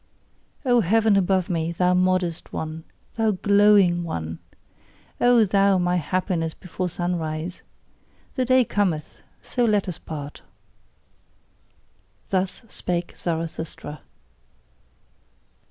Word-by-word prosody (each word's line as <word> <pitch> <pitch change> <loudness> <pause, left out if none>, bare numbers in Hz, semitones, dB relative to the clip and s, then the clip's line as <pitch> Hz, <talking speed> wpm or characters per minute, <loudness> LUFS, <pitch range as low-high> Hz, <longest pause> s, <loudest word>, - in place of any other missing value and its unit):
O 245 -2 +4
heaven 220 +2 +3
above 190 -1 +2
me, 170 -3 -1
thou 180 +1 +2
modest 180 -2 0
one! 160 +1 -5 0.3
thou 225 -1 +2
glowing 200 -3 +4
one! 80 - -4 0.8
O 245 -2 +5
thou, 195 0 +3
my 180 0 +1
happiness 175 -1 -1
before 180 0 -4
sunrise! 170 -1 -3 0.7
The 255 - 0
day 255 0 +4
cometh: 185 -8 -1 0.2
so 245 - -1
let 210 -4 +2
us 180 - -5
part! 145 -2 -7 1.9
Thus 190 +3 -1
spake 175 -4 -3
Zarathustra. 160 -2 -5
180 Hz, 100 wpm, -24 LUFS, 165-200 Hz, 1.9 s, O